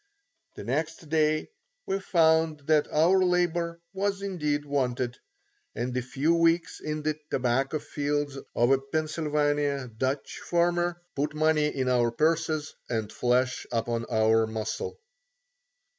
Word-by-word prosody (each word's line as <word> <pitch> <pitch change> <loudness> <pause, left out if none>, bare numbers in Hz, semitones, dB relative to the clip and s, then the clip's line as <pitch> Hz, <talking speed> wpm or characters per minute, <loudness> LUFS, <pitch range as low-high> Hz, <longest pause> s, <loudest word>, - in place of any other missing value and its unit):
The - - -7
next 155 +6 -3
day 155 - +1 0.3
we 195 - -1
found 160 -4 +3
that 150 +1 +2
our 180 +5 +4
labour 175 -2 0
was 200 0 -1
indeed 150 -7 -1
wanted, 125 -3 -1 0.6
and 125 +1 -3
a 125 - +1
few 135 +6 0
weeks 165 0 +2
in 155 0 -4
the 155 0 -1
tobacco 130 +4 +1
fields 145 -1 -2 0.2
of 120 +2 +3
a 135 - +5
Pennsylvania 145 -2 -1
Dutch 130 +4 -2
farmer 175 0 +1 0.2
put 150 +2 -1
money 155 -1 +3
into 130 -3 0
our 120 -1 +3
purses 155 +3 0 0.2
and 110 -3 -2
flesh 125 +1 +1
upon 115 0 -1
our 110 -1 +3
muscle. 110 - -4
150 Hz, 130 wpm, -27 LUFS, 125-160 Hz, 0.6 s, a